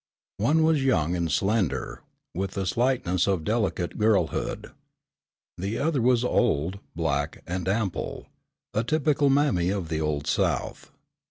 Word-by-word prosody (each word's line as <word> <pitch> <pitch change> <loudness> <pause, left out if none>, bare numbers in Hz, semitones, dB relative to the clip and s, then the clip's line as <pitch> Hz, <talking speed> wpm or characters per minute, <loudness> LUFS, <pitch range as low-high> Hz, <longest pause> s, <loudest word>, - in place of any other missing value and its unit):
One 150 +10 +3
was 155 -3 +3
young 90 - +2
and 85 -2 -1
slender 95 - 0 0.3
with 95 +1 -3
the 95 -1 -2
slightness 95 -5 +1
of 95 -5 +1
delicate 100 -5 -1
girlhood. 105 -7 0 0.9
The 100 +5 -2
other 150 -3 +1
was 125 0 +3
old, 100 -7 +1 0.2
black 75 -3 -2
and 90 0 -3
ample, 100 -2 -2 0.5
a 110 - +1
typical 150 +1 +2
mammy 135 -11 +2
of 95 -4 -2
the 80 -1 -1
old 75 -2 -1
south. - - -1
100 Hz, 135 wpm, -26 LUFS, 85-125 Hz, 0.9 s, One